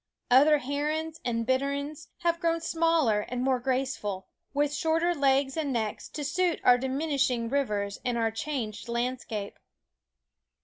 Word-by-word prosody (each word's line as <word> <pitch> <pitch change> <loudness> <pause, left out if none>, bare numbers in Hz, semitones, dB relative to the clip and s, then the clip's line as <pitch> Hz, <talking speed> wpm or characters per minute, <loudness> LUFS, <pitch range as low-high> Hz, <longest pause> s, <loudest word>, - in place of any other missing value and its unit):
Other 290 +4 +7
herons 300 +4 -2
and 230 -2 -1
bitterns 280 +4 -1
have 340 -1 +1
grown 335 -1 +1
smaller 330 -9 +2
and 250 0 -2
more 260 -1 +2
graceful, 255 -7 -2 0.3
with 290 +1 +1
shorter 330 +2 +1
legs 275 -2 +2
and 305 -4 -1
necks, 220 -4 -2
to 295 - -5
suit 345 +4 0
our 245 0 +6
diminishing 265 -3 0
rivers 210 -7 -1
and 245 -2 0
our 225 -1 +1
changed 230 -2 -4
landscape. 235 -3 -3
270 Hz, 135 wpm, -28 LUFS, 240-310 Hz, 0.3 s, Other